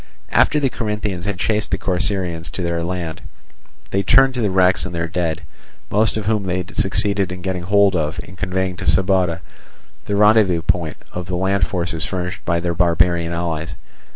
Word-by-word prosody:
After 150 - +4
the 135 -3 +1
Corinthians 105 -5 -3
had 100 -3 -2
chased 105 +3 0
the 95 - 0
Corcyraeans 90 -3 -1
to 90 - -3
the 85 -1 -1
land, 85 -2 -4 0.7
they 95 - +1
turned 135 +7 +5
to 125 - -2
the 105 - +1
wrecks 95 0 +3
and 90 -2 -5
their 85 0 -1
dead, 80 -1 -2 0.5
most 105 +1 +2
of 110 - -3
whom 105 0 +1
they 90 -1 -2
succeeded 100 -1 +1
in 90 -1 -7
getting 95 -2 -2
hold 100 +1 +3
of 80 +1 -1
and 90 - -13
conveying 95 0 -2
to - - -6
Sybota, 90 +1 +2 0.6
the 100 - -1
rendezvous 105 -5 +4 0.5
of 90 -1 -5
the 90 - -2
land 95 0 +1
forces 85 -3 0
furnished 90 -1 -4
by 85 -1 +1
their 85 0 -1
barbarian 85 0 +2
allies. 85 -3 -3
90 Hz, 180 wpm, -20 LUFS, 85-100 Hz, 0.7 s, turned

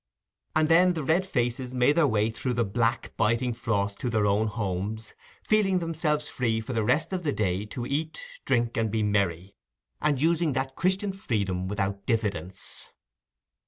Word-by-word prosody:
And 155 0 +4
then 180 +3 +5
the 160 -3 -3
red 170 +7 +2
faces 125 -2 -1
made 125 +2 +4
their 160 -1 +4
way 110 -2 +1
through 125 +3 -2
the 115 -1 +1
black 115 +4 -1
biting 120 +3 +1
frost 100 -4 -1
to 125 - -2
their 110 -2 +1
own 105 +2 +2
homes, 105 +1 -3 0.3
feeling 205 -3 +3
themselves 155 -3 -1
free 115 -3 0
for 115 +3 -5
the 115 -2 +1
rest 155 - +1
of 185 - -1
the 155 -4 0
day 100 -3 -1
to 120 +3 -5
eat, 155 +4 -2 0.2
drink, 120 -1 0
and 110 -1 +1
be 110 +1 0
merry, 100 -3 0 0.5
and 150 -3 +1
using 165 0 +2
that 135 +1 -2
Christian 190 +3 +1
freedom 100 - -2
without 100 0 -3
diffidence. 100 -4 -3
120 Hz, 170 wpm, -27 LUFS, 105-150 Hz, 0.5 s, then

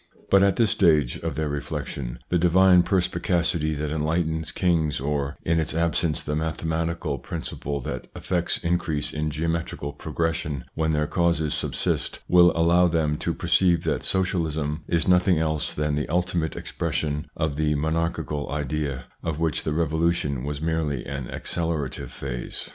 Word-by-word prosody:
But 100 - +7
at 100 -1 +4
this 115 -4 +3
stage 75 -9 +3
of - - -3
their 80 0 -1
reflection, 70 -3 -4
die 90 - +4
divine 90 +1 +6
perspicacity 85 -3 +1
that 75 0 -3
enlightens 80 +1 0
kings, 80 -5 +1
or, 70 0 -2
in 80 0 +2
its 80 0 -1
absence, 85 -2 +1
the 75 - -3
mathe 80 +1 -2
matical 80 -2 -1
principle 70 0 -4
that - - -5
effects 85 -2 0
increase 85 -4 -1
in 75 0 -1
geometrical 80 -2 -2
progression 80 -2 -2
when 80 0 0
their 75 -1 +1
causes 85 -2 +1
subsist, - - -1
win 90 -1 +7
allow 85 +2 +4
them 80 -3 +1
to - - -1
perceive 85 -3 +3
that - - 0
Socialism 80 -5 0
is 85 -2 +1
nothing 90 -1 +4
else 80 -1 0
than 75 0 -1
the 75 +1 -1
ultimate 85 -1 0
expression 75 -1 -2
of 80 -2 -1
the 75 0 +1
monarchial 80 -1 -1
idea, 70 -3 -2 0.2
of 80 -3 -2
which 80 -2 0
die - - 0
Revolution 80 -3 0
was 75 +1 -4
merely 80 -5 -1
an 70 -2 -4
accelerati 80 -1 -2
ve - - -5
phase. - - -5
80 Hz, 155 wpm, -25 LUFS, 75-85 Hz, 0.2 s, But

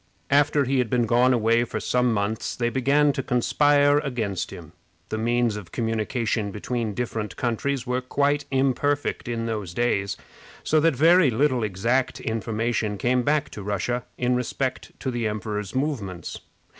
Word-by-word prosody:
After 145 0 +4
he 135 +1 +1
had 125 -3 0
been 120 0 +2
gone 120 +3 +4
away 115 -1 +3
for 120 - -4
some 125 -1 +1
months 105 +1 -2
they 120 -1 0
began 140 +3 +3
to 135 - -2
conspire 145 +4 +3
against 115 - -3
him. - - -10 0.4
The 110 - -2
means 120 -1 +1
of 105 -5 -8
communication 115 -1 -1
between 110 +1 -3
different 110 -3 -3
countries 125 +2 -1
were 125 0 -1
quite 140 +3 0
imperfect 135 +1 0
in 115 -1 -2
those 105 -6 -4
days, 100 -4 0 0.5
so 155 - +3
that 165 -2 +3
very 165 +3 +5
little 130 +1 +1
exact 115 +6 0
information 110 -1 -2
came 125 +5 +1
back 145 +3 0
to 105 - -7
Russia 105 +5 -2
in 125 0 +1
respect 125 +1 -3
to 130 - -2
the 120 -2 -1
emperor's 105 0 -4
movements. 110 - -3
120 Hz, 155 wpm, -24 LUFS, 110-135 Hz, 0.5 s, very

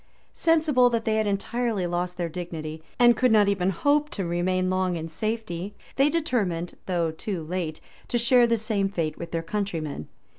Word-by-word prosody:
Sensible 305 -7 +4
that 230 -2 -1
they 220 0 +1
had 215 -1 +1
entirely 210 0 -1
lost 175 +1 -2
their 175 -1 -1
dignity, 160 -2 -6 0.2
and 240 -1 +6
could 250 +2 +3
not 210 -2 +5
even 190 -2 +1
hope 290 - +2
to 195 - -3
remain 185 +2 0
long 185 -1 0
in 160 0 -5
safety, 205 0 -3 0.2
they 275 +2 +4
determined, 210 - -1
though 170 -3 0
too 165 +1 -4
kite, 170 -3 -3 0.3
to 240 - 0
share 240 +1 +5
the 230 0 +2
same 210 -3 0
fate 165 -5 -3
with 170 - -6
their 165 -1 -2
countrymen. 165 - -3
195 Hz, 180 wpm, -26 LUFS, 170-230 Hz, 0.3 s, and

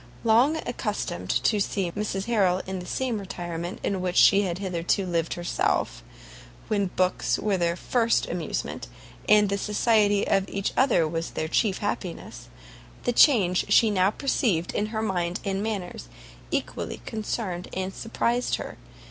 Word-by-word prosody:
Long 240 +7 +4
accustomed - - -3
to 215 - +2
see 195 -3 -1
Mrs 200 0 -3
Harrel 195 -6 +2
in 190 0 -4
the 180 - -8
same 250 -5 -1
retirement 175 -2 -5
in 195 -2 -1
which 180 -1 -2
she 200 - +7
had 180 -3 -2
hitherto 185 0 -1
lived 170 -2 -1
herself, 175 0 -1 0.7
when 205 -3 +1
books 185 0 0
were 205 -2 0
their 170 -2 0
first 230 +4 +1
amusement, - - -4 0.4
and 210 -1 +6
the 200 0 -1
society 210 -1 +2
of 195 0 +1
each 195 0 -2
other 230 - +3
was 165 +1 -3
their 155 - -3
chief 195 +3 +1
happiness, 180 - -5 0.6
the 245 - 0
change 205 - +4
she 220 +1 +5
now 190 -1 +3
perceived 210 - 0
in 210 - 0
her 220 0 -3
mind 180 -3 -1
and 195 0 -1
manners 195 - -4 0.4
equally - - -3
concerned 210 -5 -4
and 190 +1 -3
surprised 235 +3 -1
her. - - -7
195 Hz, 150 wpm, -26 LUFS, 180-215 Hz, 0.7 s, she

